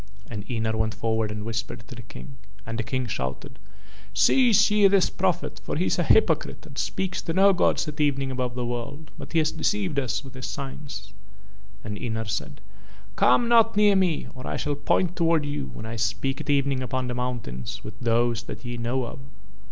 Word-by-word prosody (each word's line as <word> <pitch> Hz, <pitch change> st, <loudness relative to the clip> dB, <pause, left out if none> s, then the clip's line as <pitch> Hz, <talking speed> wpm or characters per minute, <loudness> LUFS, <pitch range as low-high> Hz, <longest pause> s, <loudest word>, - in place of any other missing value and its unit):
And 100 Hz, 0 st, -6 dB
Ynar 110 Hz, -2 st, 0 dB
went 110 Hz, -1 st, 0 dB
forward 110 Hz, 0 st, 0 dB
and 105 Hz, 0 st, -5 dB
whispered 110 Hz, 0 st, -4 dB
to 130 Hz, -, -9 dB
the 120 Hz, -, -8 dB
King. 125 Hz, +4 st, -11 dB, 0.3 s
And 115 Hz, 0 st, -4 dB
the -, -, 0 dB
King 130 Hz, +3 st, -2 dB
shouted: 65 Hz, -, -4 dB, 0.6 s
"Seize 215 Hz, -, +5 dB
ye 210 Hz, -1 st, +6 dB
this 195 Hz, -1 st, +3 dB
prophet -, -, -1 dB
for -, -, -3 dB
he -, -, +1 dB
is -, -, +1 dB
a -, -, +3 dB
hypocrite 440 Hz, -, +3 dB
and -, -, -12 dB
speaks 185 Hz, -1 st, -2 dB
to 165 Hz, -, -3 dB
no 195 Hz, +2 st, +6 dB
gods 180 Hz, -, +2 dB
at 150 Hz, 0 st, -3 dB
evening 135 Hz, -2 st, +1 dB
above 125 Hz, -1 st, -2 dB
the 125 Hz, -1 st, -2 dB
world, 120 Hz, +6 st, -5 dB
but -, -, -9 dB
has 160 Hz, -2 st, +3 dB
deceived 190 Hz, -8 st, 0 dB
us 130 Hz, +1 st, -2 dB
with 135 Hz, -2 st, -11 dB
his 130 Hz, -1 st, -5 dB
signs." 135 Hz, -8 st, -7 dB, 0.7 s
And 105 Hz, -1 st, -5 dB
Ynar 110 Hz, -3 st, -3 dB
said: 105 Hz, -, -4 dB, 0.5 s
"Come 240 Hz, -, +4 dB
not 230 Hz, -2 st, +5 dB
near 210 Hz, -1 st, +6 dB
me 185 Hz, -5 st, +2 dB
or 130 Hz, 0 st, -8 dB
I -, -, -2 dB
shall 145 Hz, -, -1 dB
point 170 Hz, +5 st, +1 dB
towards 165 Hz, -3 st, +2 dB
you 145 Hz, -, -3 dB
when 110 Hz, -, -7 dB
I 115 Hz, +1 st, -5 dB
speak 120 Hz, +7 st, -1 dB
at 150 Hz, -, -8 dB
evening 140 Hz, -2 st, +2 dB
upon 130 Hz, +1 st, -2 dB
the 125 Hz, -, -2 dB
mountain 120 Hz, -, -4 dB, 0.2 s
with 105 Hz, +1 st, -9 dB
Those 120 Hz, -1 st, +2 dB
that -, -, -8 dB
ye 120 Hz, 0 st, -4 dB
know 120 Hz, +2 st, -1 dB
of." 120 Hz, -, -8 dB
130 Hz, 200 wpm, -26 LUFS, 115-155 Hz, 0.7 s, ye